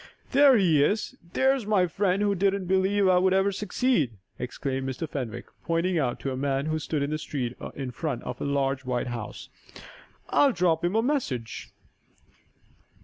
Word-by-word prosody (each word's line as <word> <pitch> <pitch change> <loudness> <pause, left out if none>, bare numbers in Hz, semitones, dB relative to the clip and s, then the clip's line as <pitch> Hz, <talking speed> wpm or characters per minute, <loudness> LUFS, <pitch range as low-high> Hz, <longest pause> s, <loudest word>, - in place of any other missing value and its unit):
"There 275 -2 +6
he 165 -8 +4
is! 210 - 0 0.2
There's 265 -4 +2
my 200 -4 +3
friend 190 +2 0
who 205 -1 +2
didn't 195 0 +1
believe 190 +2 +2
I 180 -1 +5
would 190 +1 +3
ever 195 +1 +3
succeed!" 195 - 0 0.2
exclaimed 130 +1 -3
Mr. 130 +5 -4
Fenwick, 120 -5 -5 0.2
pointing 170 +2 0
to 135 -1 -1
a - - -3
man 135 +1 -1
who 155 0 -1
stood 150 -1 -2
in 140 - -2
the 155 - -1
street 125 -5 -4 0.2
in 135 -2 -4
front 135 0 -4
of 125 0 -6
a - - -2
large, 135 -1 0
white 125 -1 -2
house. 115 -3 -6 0.8
"I'll 280 -3 +4
drop 170 -4 +1
him 175 +4 0
a 225 - +3
message!" 150 - -2
165 Hz, 170 wpm, -27 LUFS, 135-200 Hz, 0.8 s, There